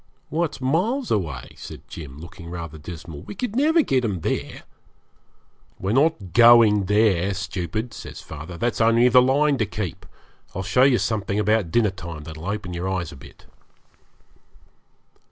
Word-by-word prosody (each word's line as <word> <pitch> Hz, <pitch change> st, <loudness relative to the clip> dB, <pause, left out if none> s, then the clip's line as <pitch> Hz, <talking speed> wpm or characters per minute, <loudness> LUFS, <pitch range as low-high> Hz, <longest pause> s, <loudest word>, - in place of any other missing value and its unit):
'Why, 165 Hz, +4 st, +1 dB
it's 150 Hz, -, -7 dB
miles 190 Hz, -, 0 dB
away,' 75 Hz, -, -2 dB
said -, -, -10 dB
Jim, 70 Hz, -5 st, -9 dB
looking 85 Hz, +1 st, -10 dB
rather 85 Hz, -3 st, -7 dB
dismal. 80 Hz, -1 st, -9 dB
'We -, -, -9 dB
could 225 Hz, +1 st, -4 dB
never 310 Hz, +5 st, +4 dB
get 130 Hz, -, +1 dB
'em 100 Hz, -7 st, -2 dB
there.' -, -, -3 dB, 1.1 s
'We're 95 Hz, -, -2 dB
not 130 Hz, -, +1 dB
going 115 Hz, -4 st, +7 dB
there, 100 Hz, -2 st, +2 dB
stupid,' 95 Hz, +4 st, -4 dB
says -, -, -9 dB
father; 80 Hz, +3 st, -9 dB
'that's 120 Hz, +2 st, -1 dB
only 115 Hz, +2 st, +5 dB
the 125 Hz, +1 st, +7 dB
line 140 Hz, +2 st, +2 dB
to 110 Hz, -, +2 dB
keep. 100 Hz, -5 st, -5 dB, 0.5 s
I'll 95 Hz, -, -3 dB
show 125 Hz, -, +2 dB
you 130 Hz, -2 st, +5 dB
something 105 Hz, -3 st, -1 dB
about 105 Hz, -3 st, +1 dB
dinner 105 Hz, +3 st, +2 dB
time 85 Hz, -5 st, -8 dB
that'll 80 Hz, +2 st, -8 dB
open 100 Hz, -3 st, -4 dB
your 90 Hz, +2 st, -3 dB
eyes 90 Hz, -4 st, -2 dB
a -, -, -10 dB
bit.' 65 Hz, -, -15 dB
105 Hz, 160 wpm, -23 LUFS, 85-125 Hz, 1.1 s, going